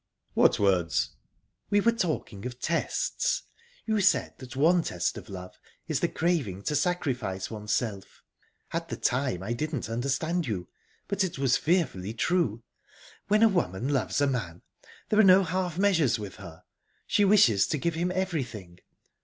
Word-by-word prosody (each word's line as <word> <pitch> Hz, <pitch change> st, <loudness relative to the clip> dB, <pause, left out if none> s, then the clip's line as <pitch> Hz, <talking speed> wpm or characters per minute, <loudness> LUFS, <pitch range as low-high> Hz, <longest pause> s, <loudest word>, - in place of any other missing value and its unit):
"What -, -, +4 dB
words?" 95 Hz, -5 st, +1 dB, 0.6 s
"We 205 Hz, -, +4 dB
were 230 Hz, +3 st, +4 dB
talking 155 Hz, -, -3 dB
of 125 Hz, 0 st, -9 dB
tests. 170 Hz, -, -1 dB, 0.4 s
You 220 Hz, -2 st, +1 dB
said 200 Hz, -, +2 dB
that 130 Hz, -1 st, -10 dB
one 170 Hz, +6 st, +4 dB
test 90 Hz, -, -2 dB
of -, -, -10 dB
love 90 Hz, -2 st, -9 dB, 0.3 s
is -, -, 0 dB
the -, -, +1 dB
craving 140 Hz, -, -1 dB
to 150 Hz, -, -1 dB
sacrifice 130 Hz, -, -1 dB
oneself. 105 Hz, -1 st, -3 dB, 0.5 s
At -, -, -3 dB
the -, -, -3 dB
time, 125 Hz, -7 st, 0 dB
I 110 Hz, +4 st, -2 dB
didn't 145 Hz, -2 st, -3 dB
understand 140 Hz, +7 st, -1 dB
you, 90 Hz, -6 st, -3 dB, 0.4 s
but 200 Hz, -1 st, 0 dB
it 180 Hz, -6 st, -3 dB
was 135 Hz, -2 st, +2 dB
fearfully 130 Hz, -, 0 dB
true. 120 Hz, -, 0 dB, 0.6 s
When 210 Hz, +2 st, +4 dB
a -, -, +8 dB
woman 135 Hz, -, -1 dB
loves 140 Hz, 0 st, 0 dB
a -, -, +5 dB
man, 105 Hz, -11 st, -3 dB, 0.5 s
there 215 Hz, -, +3 dB
are -, -, +8 dB
no 190 Hz, 0 st, +7 dB
half 180 Hz, -1 st, -2 dB
measures 165 Hz, -, +3 dB
with 105 Hz, -3 st, -8 dB
her -, -, -11 dB, 0.4 s
she 205 Hz, -, +2 dB
wishes 185 Hz, -, +5 dB
to 155 Hz, -, -1 dB
give 170 Hz, +4 st, -1 dB
him 175 Hz, +3 st, -1 dB
everything. 130 Hz, -, -3 dB
140 Hz, 160 wpm, -28 LUFS, 105-180 Hz, 0.6 s, a